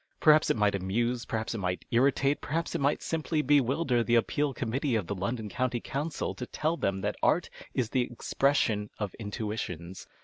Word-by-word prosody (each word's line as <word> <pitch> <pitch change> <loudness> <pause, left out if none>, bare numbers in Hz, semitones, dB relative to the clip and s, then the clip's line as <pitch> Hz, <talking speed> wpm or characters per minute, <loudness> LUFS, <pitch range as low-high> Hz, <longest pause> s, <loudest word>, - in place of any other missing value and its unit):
Perhaps 155 0 +6
it - - +2
might 105 -1 +3
amuse, 115 +6 -1
perhaps 110 0 -2
it 115 - -3
might 90 -1 -2
irritate, 135 +3 +3
perhaps 160 +2 -2
it - - -1
might 140 +2 +1
simply 160 -1 -1
bewilder 135 -2 +3
the 120 +1 +2
Appeal 145 +5 +2
Committee 130 +1 -1
of 105 -5 0
the 100 - -3
London 105 +4 -3
County 125 +3 -1
Comieil 145 +6 -3
to 125 - -4
tell 155 +2 -1
them 100 - -1
that 105 +2 -2
art 175 - +2 0.2
is 120 -4 0
the 130 - +2
expression 115 -4 +1
of 105 -3 -3
intuitions. 100 -5 -5
120 Hz, 180 wpm, -29 LUFS, 105-140 Hz, 0.2 s, Perhaps